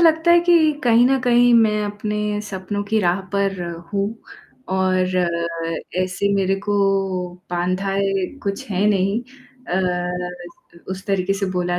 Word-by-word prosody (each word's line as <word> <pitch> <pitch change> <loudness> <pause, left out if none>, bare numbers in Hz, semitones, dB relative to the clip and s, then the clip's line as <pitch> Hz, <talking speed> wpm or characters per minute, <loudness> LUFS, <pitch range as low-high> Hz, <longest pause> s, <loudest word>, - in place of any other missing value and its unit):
लगता 325 0 +4
है 345 0 +7
कि 335 -3 +4
कहीं 235 0 +5
न 270 0 +3
कहीं 245 -1 +4
मैं 210 -2 +4
अपने 210 0 -2
सपनों 205 0 -4
की 215 +2 +1
राह 180 0 +1
पर 195 -2 0 0.3
हूँ 200 0 +1 0.6
और 185 -1 +1 1.0
ऐसे 185 +2 -1
मेरे 195 0 +2
को 205 0 -2 0.8
बाँधा 185 +2 -1
है, 195 -1 0 0.2
कुछ 200 -1 -3
है 195 +2 +1
नहीं 200 +2 +1 0.5
अ, 180 -1 -3
उस 190 +1 -5
तरीके 195 -1 +1
से 195 0 -2
बोला 175 -1 -1
195 Hz, 140 wpm, -21 LUFS, 185-210 Hz, 1.0 s, है